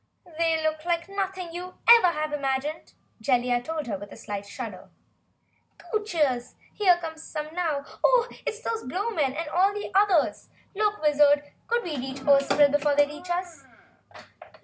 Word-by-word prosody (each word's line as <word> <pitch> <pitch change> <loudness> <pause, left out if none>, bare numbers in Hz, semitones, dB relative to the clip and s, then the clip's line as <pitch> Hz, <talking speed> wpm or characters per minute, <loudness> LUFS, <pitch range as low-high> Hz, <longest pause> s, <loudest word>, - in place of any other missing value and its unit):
"They 325 -1 +2
look 310 0 -1
like 340 -1 -1
nothing 385 -3 -4
you 360 +1 -7
ever 465 -5 +9
have 310 -3 -1
imagined!" 280 +2 -2 0.3
Jellia 245 0 +1
told 315 +1 -4
her 200 -5 -4
with 205 +1 -10
a - - -11
slight 205 -1 -6
shudder. - - -8 0.9
"Goochers! 315 - -1 0.2
Here 370 -4 +4
come 325 -2 -7
some 310 -1 -6
now! 335 -4 0
And 280 - -7 0.2
oh - - +4 0.2
it's 440 +1 -4
those 455 -1 -3
Blowmen 320 - -1
and 330 -1 -3
all 370 +5 +3
the 415 - -5
others! 390 -5 +2 0.2
Look, 420 0 0
Wizard! 290 -1 +4 0.2
Could 475 +1 0
we 325 -5 -4
reach 265 +1 -5
the 285 - +2
Ozpril 280 +1 +5
before 290 0 +2
they 290 0 +5
reach 305 +5 -10
us?" 350 -1 -3
320 Hz, 165 wpm, -26 LUFS, 285-365 Hz, 0.9 s, ever